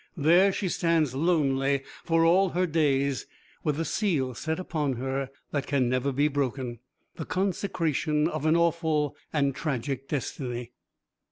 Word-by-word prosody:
There 175 Hz, +6 st, +5 dB
she 190 Hz, 0 st, -2 dB
stands 165 Hz, -6 st, +1 dB
lonely 140 Hz, -3 st, +1 dB, 0.2 s
for 165 Hz, -1 st, +3 dB
all 185 Hz, +3 st, +4 dB
her 180 Hz, +2 st, +1 dB
days, 140 Hz, -6 st, +1 dB, 0.4 s
with 150 Hz, -, +1 dB
the 165 Hz, +2 st, -2 dB
seal 155 Hz, -, 0 dB
set 160 Hz, +7 st, -3 dB
upon 155 Hz, -6 st, -1 dB
her 135 Hz, +2 st, -3 dB, 0.2 s
that 145 Hz, -2 st, -2 dB
can 130 Hz, -4 st, +1 dB
never 130 Hz, +2 st, 0 dB
be 145 Hz, +3 st, +2 dB
broken, 130 Hz, -4 st, -2 dB, 0.4 s
the 160 Hz, -, -4 dB
consecration 165 Hz, -5 st, 0 dB
of 155 Hz, -2 st, -2 dB
an 160 Hz, -, +4 dB
awful 160 Hz, -4 st, +1 dB, 0.2 s
and 140 Hz, -3 st, +1 dB
tragic 135 Hz, -2 st, -3 dB
destiny. 125 Hz, -4 st, -4 dB
150 Hz, 145 wpm, -27 LUFS, 135-165 Hz, 0.4 s, There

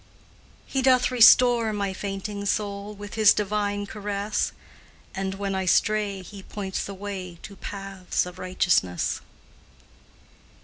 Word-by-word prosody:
He 270 Hz, -, -1 dB
doth 255 Hz, -1 st, +4 dB
restore 240 Hz, -1 st, +6 dB
my 200 Hz, -2 st, -2 dB
fainting 200 Hz, +1 st, -4 dB
soul 205 Hz, 0 st, -2 dB
With 205 Hz, 0 st, -9 dB
His 215 Hz, -2 st, +6 dB
divine 205 Hz, 0 st, -1 dB
caress, 205 Hz, 0 st, -2 dB, 0.6 s
And, 190 Hz, 0 st, -3 dB
when 200 Hz, 0 st, -3 dB
I 190 Hz, 0 st, -1 dB
stray, 205 Hz, 0 st, +2 dB
He 200 Hz, +1 st, -10 dB
points 190 Hz, -1 st, -4 dB
the 200 Hz, -, -6 dB
way 190 Hz, -3 st, -6 dB
To 200 Hz, -, -9 dB
paths 195 Hz, -3 st, -3 dB
of 180 Hz, 0 st, -10 dB
righteousness. 175 Hz, -, +1 dB
200 Hz, 125 wpm, -25 LUFS, 190-210 Hz, 0.6 s, restore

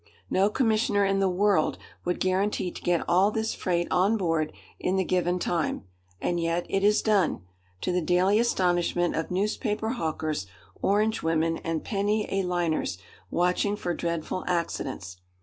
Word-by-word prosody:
No 195 Hz, +2 st, +3 dB
commissioner 215 Hz, -3 st, +2 dB
in 195 Hz, 0 st, +1 dB
the 195 Hz, -1 st, +3 dB
world 190 Hz, -3 st, +2 dB, 0.3 s
would 180 Hz, 0 st, -1 dB
guarantee 185 Hz, 0 st, 0 dB
to -, -, -9 dB
get 175 Hz, -1 st, 0 dB
all 185 Hz, +4 st, +4 dB
this 220 Hz, +1 st, -1 dB
freight 175 Hz, -1 st, -1 dB
on 195 Hz, +5 st, +3 dB
board 165 Hz, -5 st, 0 dB, 0.3 s
in 185 Hz, -, 0 dB
the 190 Hz, -, +2 dB
given 180 Hz, 0 st, +1 dB
time, 170 Hz, -, -1 dB, 0.4 s
and 175 Hz, 0 st, -1 dB
yet 170 Hz, +1 st, 0 dB
it 195 Hz, -, 0 dB
is 210 Hz, +1 st, +4 dB
done, 200 Hz, -, +2 dB, 0.4 s
to -, -, -1 dB
the 180 Hz, 0 st, +1 dB
daily 180 Hz, +5 st, +3 dB
astonishment 175 Hz, -6 st, +1 dB
of 160 Hz, -, -2 dB
newspaper 210 Hz, +3 st, -1 dB
hawkers, 155 Hz, -, -2 dB, 0.3 s
orange 210 Hz, +2 st, +2 dB
women, 165 Hz, 0 st, +1 dB
and 165 Hz, -1 st, -3 dB
penny 210 Hz, +1 st, 0 dB
a 195 Hz, -, +2 dB
liners 175 Hz, -, -1 dB, 0.3 s
watching 180 Hz, -, +1 dB
for 175 Hz, -4 st, -2 dB
dreadful 170 Hz, +2 st, -3 dB
accidents. 135 Hz, -, -2 dB
180 Hz, 155 wpm, -27 LUFS, 170-205 Hz, 0.4 s, all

